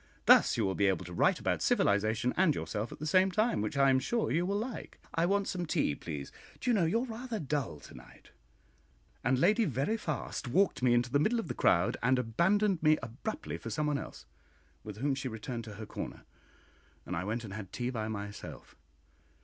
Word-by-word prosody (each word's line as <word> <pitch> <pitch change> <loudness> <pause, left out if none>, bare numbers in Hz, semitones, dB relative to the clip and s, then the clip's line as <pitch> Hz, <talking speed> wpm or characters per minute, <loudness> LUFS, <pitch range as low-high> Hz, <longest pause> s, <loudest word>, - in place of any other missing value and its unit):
Thus - - +6
you 110 - +2
will 95 - 0
be 100 +1 +2
able 95 -1 0
to 90 - -8
write - - +3
about - - -1
civilisation 110 +4 +2
and 180 -6 +3
yourself 105 +2 -3
at - - -8
the 155 - -6
same 185 +4 +4
time, 215 - +1
which 110 +6 -3
I 135 -1 +5
am 130 - +4
sure 230 - -1
you 170 +3 +1
will 200 +1 0
like. 230 +2 -5 0.2
I 165 +1 +2
want 200 +1 +1
some 175 -2 -3
tea, 75 - +1
please; 70 -2 -6 0.3
do 250 - 0
you - - +3
know 195 -6 +3
you 220 +9 +1
are - - -2
rather 235 -1 -5
dull 140 - -2
to - - -13
night?" - - -15 0.9
And 130 +2 +2
Lady 215 - +4
Veriphast 150 - -2
walked 190 +8 +2
me 125 -1 +4
into 120 +1 +1
the 145 - +3
middle 220 +11 +2
of 225 - -5
the - - -1
crowd, - - +2
and 130 +2 +3
abandoned 180 - +2
me 155 0 +5
abruptly 120 - -5
for - - -6
somebody 150 -2 0
else, - - -9 0.6
with 105 -1 -8
whom 140 +4 0
she 135 0 -3
returned 115 0 -5
to 105 -2 -9
her 110 +2 -7
corner, - - -7 0.8
and 90 - -4
I 85 - -2
went 110 +4 -3
and 100 -3 -7
had 100 -3 -7
tea 125 +1 -2
by 110 -3 -3
myself. 105 -1 -7
130 Hz, 215 wpm, -31 LUFS, -, 0.9 s, Thus